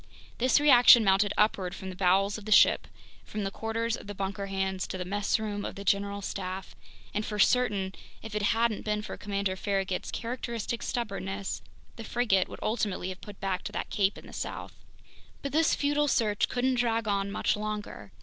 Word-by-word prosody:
This 255 +3 +4
reaction 245 -5 +8
mounted 200 +1 +3
upward 195 -3 +1
from 190 0 -6
the - - -9
bowels 195 +2 +3
of 205 - -13
the 215 - -5
ship, - - +6 0.4
from 210 -1 -5
the 195 - -2
quarters 225 +2 -2
of - - -11
the 205 - -6
bunker 195 +1 -3
hands 190 -1 -2
to 185 - -5
the 180 - -4
messroom 205 +1 -1
of - - -5
the 200 - -7
general 200 +1 0
staff; 190 0 -5 0.4
and 210 - -1
for 210 -1 -4
certain, 205 -3 +2 0.3
if 220 -1 -7
it 210 - -1
hadn't 225 +1 +1
been 210 0 -1
for - - -6
Commander 200 -2 -2
Farragut's 195 -1 -2
characteristic 235 -1 -4
stubbornness, 195 -4 -3 0.4
the 225 - -6
frigate 220 -5 +1
would - - -8
ultimately 210 -4 -1
have 185 0 -7
put 205 -2 -11
back 190 -2 -2
to - - -4
that - - -4
cape 200 0 +1
in - - -12
the - - -12
south. - - -5 0.7
But 280 - -3
this 315 +3 +3
futile 290 +1 +1
search 210 -6 +1
couldn't 255 0 +1
drag 230 -2 +1
on 200 -1 0
much 200 - 0
longer. 210 - -5
205 Hz, 190 wpm, -29 LUFS, 195-230 Hz, 0.7 s, reaction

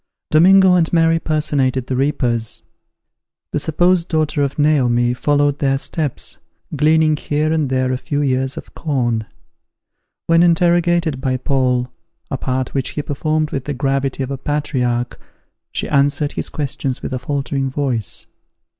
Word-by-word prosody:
Domingo 185 +4 +6
and 170 -3 +2
Mary 165 -1 +3
personated 140 -5 0
the 130 - -2
reapers. 125 -5 -1 0.9
The - - 0
supposed 175 +3 +1
daughter 155 -2 0
of 140 -1 -1
Naomi 125 -5 +2
followed 145 +2 +1
their 135 -1 +1
steps, 145 0 -4 0.4
gleaning 155 +1 +3
here 150 +1 -1
and 155 -4 0
there 130 0 0
a 125 - -2
few 145 +2 -2
ears 130 0 -1
of - - -9
corn. 120 -8 -1 1.0
When 165 0 +4
interrogated 170 -3 +2
by 130 -2 0
Paul, 125 -2 0 0.4
a 135 - -1
part 130 -1 -2
which 135 -2 -1
he 150 - -1
performed 155 +2 -1
with 135 -2 -3
the 145 - -3
gravity 135 0 -1
of 130 - -5
a 135 - -4
patriarch, 125 -5 -2 0.5
she - - -3
answered 145 +1 +1
his - - -4
questions 140 -3 -3
with - - -4
a 130 - -2
faltering 135 0 -2
voice. 130 -7 -3
140 Hz, 145 wpm, -18 LUFS, 130-155 Hz, 1.0 s, Domingo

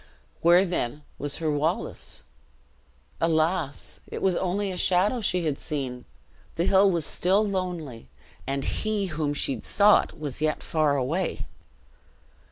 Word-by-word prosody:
Where 175 +3 +6
then 150 -5 -2 0.2
was 145 0 -2
her 160 -2 -1
Wallace? 155 +4 -2 1.0
Alas! 160 -2 0
it - - -6
was 190 -2 +3
only 190 +2 -1
a - - -5
shadow 190 +7 +2
she 180 -4 0
had 145 -3 -1
seen! 130 -5 -4 0.5
the 170 - 0
hill 195 +1 +5
was 170 -5 0
still 195 +4 +2
lonely, 175 - -4 0.4
and 135 0 -1
he 215 -2 -1
whom 150 -2 -1
she 135 -4 -1
sought 205 -4 +3
was 145 -2 -5
yet 155 -1 0
far 155 -3 +1
away! 160 +8 -1
165 Hz, 135 wpm, -26 LUFS, 145-185 Hz, 1.0 s, Where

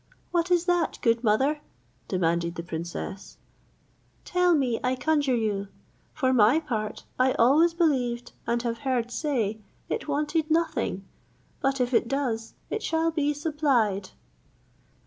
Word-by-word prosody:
"What 345 0 +1
is 355 -1 +3
that, 350 -1 +1
good 230 -1 +2
mother?" 265 +8 +2 0.5
demanded 170 -2 0
the 170 - -5
princess; 170 +4 -6 0.9
"tell 360 -1 +3
me, 255 -6 +1
I 255 +1 +1
conjure 285 -1 +1
you. 205 -3 -1 0.4
For 260 -4 +1
my 240 +5 +5
part, 220 -9 -4 0.2
I 255 0 +4
always 310 +8 +4
believed, 250 -8 0 0.2
and 235 0 0
have 230 -1 -2
heard 250 -4 -1
say, 235 -7 -1 0.3
it - - -3
wanted 300 +2 0
nothing; 315 - 0 0.6
but 270 0 +1
if 250 0 0
it 230 - +3
does, 240 -4 -2 0.2
it 435 - -2
shall 325 0 +1
be 295 -2 +1
supplied." 270 - +1
260 Hz, 135 wpm, -26 LUFS, 225-310 Hz, 0.9 s, my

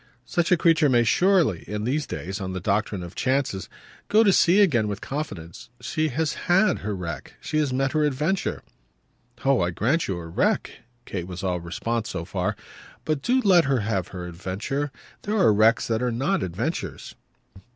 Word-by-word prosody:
Such 175 +5 0
a 180 - +6
creature 165 -3 +4
may 120 -2 +4
surely, 175 - +3
in 105 0 -3
these 140 +6 -1
days, 95 +7 -5
on 95 -1 -4
the 95 - -3
doctrine 100 0 -1
of 85 - -8
chances, 130 -7 -1 0.4
go 215 +2 +5
to 200 -3 +4
sea 180 +3 +5
again 120 - +3
with 100 0 -3
confidence. 100 - -6
She 155 +6 -1
has 155 +2 -1 0.2
HAD 190 +4 +4
her 105 0 -3
wreck 85 -6 -6
she 155 - -2
has 145 -3 +1
met 135 +1 0
her 155 -1 +1
adventure." 150 +7 -1 0.8
"Oh 135 -4 +4
I 85 - +1
grant 125 - 0
you 95 - -2
her 85 -1 -7
wreck!" - - +1 0.3
Kate 90 -3 -5
was 90 +1 -7
all 90 -2 0
response 110 +7 -3
so 85 - -4
far. - - -2 0.5
"But 155 -3 -1
do 255 - +2
let 185 -6 +5
her 135 -3 +1
have 100 -3 -1
still 90 - -8
her 90 - -5
adventure. 100 +11 -3 0.3
There 215 +1 -1
are 180 - +5
wrecks 110 +3 +4
that 115 0 0
are 125 -1 0
not 145 +12 0
adventures." 95 - -4
120 Hz, 190 wpm, -25 LUFS, 95-155 Hz, 0.8 s, a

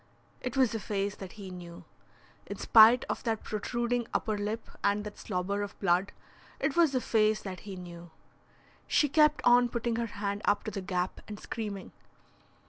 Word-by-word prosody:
It 250 +1 -4
was 255 -4 +3
a 225 - -2
face 200 -1 -2
that 190 -2 -9
he 195 -3 -9
knew. 175 -1 -10 0.6
In - - -6
spite 230 +3 +7
of - - -3
that 225 -2 -2
protruding 240 +2 -2
upper 215 - 0
lip 210 +2 -3 0.2
and 205 +1 +2
that 210 -1 -8
slobber 200 +1 -2
of 205 0 -6
blood, 185 +1 +2 0.5
it 275 - 0
was 330 -5 +4
a 255 - +2
face 215 -2 +2
that 190 -2 -6
he 195 - -5
knew. 175 -1 -10 0.8
She 295 - +3
kept 300 +1 +3
on 245 0 +5
putting 235 -1 -2
her 235 0 -1
hand 200 -1 -4
up 205 - +2
to 215 - -4
the 200 - -4
gap 180 -1 -2
and 210 -1 -7
screaming. 210 -4 -6
210 Hz, 180 wpm, -30 LUFS, 195-235 Hz, 0.8 s, spite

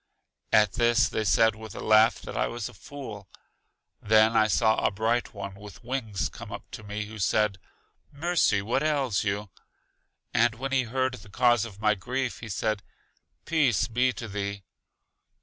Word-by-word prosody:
At 105 -3 +4
this 120 0 +3
they 110 - -2
said 110 +1 +4
with 110 -2 -10
a - - -6
laugh 110 +2 +4
that - - -7
I - - +1
was 120 -3 -4
a - - -11
fool. 105 -4 -9 0.7
Then 110 +1 +4
I 110 -1 +5
saw 110 0 +3
a - - +4
Bright 110 +4 -1
One 100 -1 -6
with 100 +1 -12
wings 115 -6 -2
come - - -10
up - - -6
to - - -8
me, 105 0 -4
who 110 +1 -10
said, 100 0 +1 0.5
Mercy, 150 - +1
what 120 +6 0
ails 140 -9 +1
you? 100 -1 -2 0.8
And 115 -1 +3
when 135 +3 -4
he 135 -2 +2
heard 130 +2 -1
the 115 -4 -11
cause 120 +1 +3
Of 105 -3 -11
my 105 0 +3
grief, 125 +5 -3
he 115 - -8
said, 110 +2 -1 0.6
Peace 145 - +2
be 125 +2 +2
to 115 - -7
thee. 100 -1 -4
110 Hz, 175 wpm, -27 LUFS, 105-125 Hz, 0.8 s, I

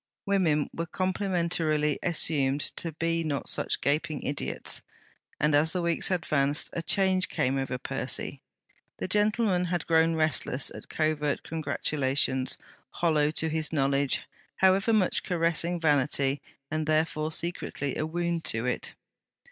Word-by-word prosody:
Women 170 -7 +2
were 165 0 -3
complimentarily 170 -5 0
assumed 145 -5 +1 0.2
to 165 - -3
be 165 +1 0
not 145 -3 -2
such - - -1
gaping 155 +1 0
idiots. 145 - -1 0.6
And 150 0 +2
as 150 +3 +4
the 180 - 0
weeks 170 -1 +1
advanced, 150 -5 +1
a 170 - -2
change 190 +1 +2
came 135 +2 0
over 135 -1 -2
Percy. - - -3 0.6
The - - -3
gentleman 210 -2 +2
had 175 -1 -2
grown 165 0 +3
restless 155 -4 0
at - - -10
covert 155 -2 0
congratulations, 140 -4 0 0.3
hollow 155 -2 +2
to 160 +1 +1
his 160 -1 +1
knowledge, 140 -2 +1 0.3
however 190 +3 +3
much 210 -5 +3
caressing 170 0 0
vanity, 140 -2 +2 0.3
and 155 -1 -1
therefore 155 0 +1
secretly 155 -4 -2
a - - -1
wound 170 0 -2
to 115 +1 -1
it. 125 - -2
160 Hz, 130 wpm, -28 LUFS, 145-170 Hz, 0.6 s, as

